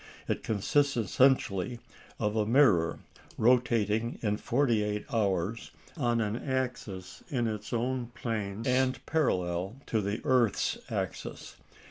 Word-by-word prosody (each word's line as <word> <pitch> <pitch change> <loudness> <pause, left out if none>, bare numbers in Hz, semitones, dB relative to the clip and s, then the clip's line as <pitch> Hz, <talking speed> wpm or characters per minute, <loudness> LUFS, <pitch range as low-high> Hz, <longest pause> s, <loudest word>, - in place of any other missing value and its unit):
It - - -1
consists 135 +6 +1
essentially 120 -1 +2 0.4
of 105 -1 0
a 110 - +2
mirror 110 - +4 0.4
rotating 115 -2 +2
in 105 -1 +1
forty 120 -3 +1
eight 105 0 -2
hours 100 0 0 0.3
on 120 -7 +1
an 105 0 -1
axis 120 -9 -4
in 125 -4 0
its 105 -2 -4
own 125 +1 -1
plane, 110 -2 -3
and 130 +1 +1
parallel 95 - 0
to 110 - 0
the 100 +3 -2
earth's 125 -7 +2
axis. - - -4
115 Hz, 120 wpm, -30 LUFS, 105-125 Hz, 0.4 s, mirror